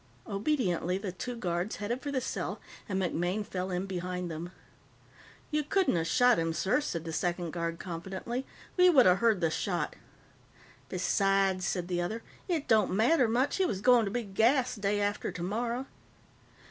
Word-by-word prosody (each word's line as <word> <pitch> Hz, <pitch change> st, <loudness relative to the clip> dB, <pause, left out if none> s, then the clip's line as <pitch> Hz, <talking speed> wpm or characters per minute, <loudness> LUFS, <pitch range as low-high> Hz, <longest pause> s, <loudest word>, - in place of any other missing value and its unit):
Obediently, 195 Hz, -, 0 dB
the 195 Hz, -1 st, -4 dB
two 245 Hz, +7 st, -5 dB
guards 180 Hz, -2 st, -2 dB
headed 235 Hz, +5 st, -3 dB
for 290 Hz, -, -4 dB
the 270 Hz, -, +1 dB
cell, 255 Hz, -, -3 dB, 0.3 s
and 190 Hz, -1 st, 0 dB
MacMaine 180 Hz, +3 st, -1 dB
fell 185 Hz, -1 st, -3 dB
in 180 Hz, +1 st, -2 dB
behind 180 Hz, -2 st, -4 dB
them. 165 Hz, +3 st, -6 dB, 1.0 s
"You 305 Hz, 0 st, +2 dB
couldn't 375 Hz, -, +2 dB
of 165 Hz, -1 st, 0 dB
shot 245 Hz, +5 st, +4 dB
him, 165 Hz, 0 st, 0 dB
sir," 195 Hz, -, +1 dB
said 170 Hz, -, -4 dB
the 165 Hz, -, -4 dB
second 175 Hz, 0 st, -1 dB
guard 170 Hz, 0 st, -3 dB
confidently. 190 Hz, +9 st, -5 dB, 0.3 s
"We 360 Hz, 0 st, +7 dB
would 275 Hz, -8 st, +6 dB
of 180 Hz, 0 st, +5 dB
heard 225 Hz, -5 st, +3 dB
the 165 Hz, -1 st, +2 dB
shot." 175 Hz, -2 st, -2 dB, 0.9 s
"Besides," 195 Hz, 0 st, +1 dB
said 180 Hz, -2 st, -2 dB
the 175 Hz, -1 st, -1 dB
other, 220 Hz, +6 st, -3 dB, 0.2 s
"it 330 Hz, -6 st, -1 dB
don't 220 Hz, -4 st, +4 dB
matter 245 Hz, +5 st, +4 dB
much. 245 Hz, +5 st, +1 dB
He 380 Hz, -, +3 dB
was 190 Hz, -, -2 dB
going 245 Hz, +1 st, +5 dB
to -, -, -2 dB
be 240 Hz, +2 st, -1 dB
gassed 230 Hz, +3 st, +2 dB
day 205 Hz, +1 st, +1 dB
after 205 Hz, 0 st, -1 dB
tomorrow." 235 Hz, +8 st, -2 dB
195 Hz, 170 wpm, -30 LUFS, 180-240 Hz, 1.0 s, We